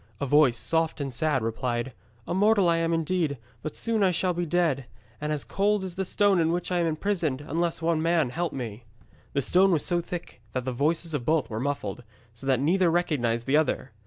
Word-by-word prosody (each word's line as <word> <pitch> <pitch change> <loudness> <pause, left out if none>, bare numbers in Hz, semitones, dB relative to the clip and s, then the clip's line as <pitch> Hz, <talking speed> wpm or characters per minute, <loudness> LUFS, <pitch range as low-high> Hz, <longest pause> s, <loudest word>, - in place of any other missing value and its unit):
A - - -1
voice, 140 -3 +4
soft 165 -1 0
and 135 -3 -3
sad, 135 0 0
replied, 120 +2 -2 0.3
'A - - -3
mortal 205 0 +4
I 170 0 +3
am 165 0 0
indeed, 165 -2 0 0.2
but 155 - -5
soon 215 -5 +2
shall 180 +2 +1
I - - -2
be 175 0 -2
dead, 155 -7 +1 0.3
and 150 0 -2
as 150 -2 -2
cold 205 0 +1
as 185 -2 -5
the 190 +2 -2
stone 200 0 +3
in 165 0 +2
which 175 +1 -2
I 180 - +2
am 170 - +2
imprisoned, 160 -4 -1
unless 165 +3 -2
one 165 -1 +1
man 165 -5 +2
help 170 +2 -2
me.' 120 -3 -6 0.5
The 140 - 0
stone 185 +8 +4
was 160 -4 +1
so 175 -1 +1
thick 170 -7 -7
that 130 -1 -2
the 130 - -1
voices 160 +5 0
of 145 -5 -1
both 155 -2 +1
were 110 - -3
muffled, 125 -4 -3 0.3
so 115 +4 -9
that 130 -2 +3
neither 175 +5 +3
recognised 125 -9 0
the 140 +2 +3
other. 145 -4 0
160 Hz, 215 wpm, -27 LUFS, 135-175 Hz, 0.5 s, voice